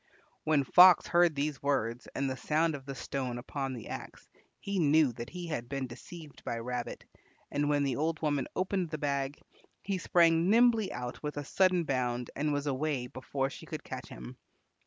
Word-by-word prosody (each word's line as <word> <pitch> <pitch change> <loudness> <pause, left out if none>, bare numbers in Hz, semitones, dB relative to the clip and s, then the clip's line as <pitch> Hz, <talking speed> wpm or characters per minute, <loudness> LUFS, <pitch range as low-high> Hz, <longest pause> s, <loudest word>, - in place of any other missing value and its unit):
When 155 -3 +3
Fox 180 +6 +8
heard 175 -2 +3
these 145 0 -2
words 125 -4 -1
and 140 - 0
the 130 - -2
sound 155 +5 +1
of 135 -2 -8
the 135 - -5
stone 130 -1 -3
upon 135 +2 -4
the 115 - -8
axe, - - -8 0.3
he 200 -1 -2
knew 155 -3 +4
that 120 +1 -7
he 180 -1 -6
had 120 -8 -4
been 135 -1 -2
deceived 145 +5 -11
by 115 - -3
Rabbit, 120 +1 -5 0.5
and 145 0 0
when 145 -1 +2
the 135 -3 0
old 155 +1 0
woman 145 -4 0
opened 185 -2 -1
the 155 - -4
bag 140 -1 -1 0.5
he 195 -1 -2
sprang 170 0 +4
nimbly 230 -1 +4
out 125 0 -6
with 150 -1 -4
a 145 - -2
sudden 185 +2 +3
bound 125 -4 -1
and 150 +2 0
was 145 0 -1
away 140 -2 -1
before 135 +2 -3
she - - -10
could - - -6
catch - - -7
him. - - -9
145 Hz, 190 wpm, -31 LUFS, 130-165 Hz, 0.5 s, Fox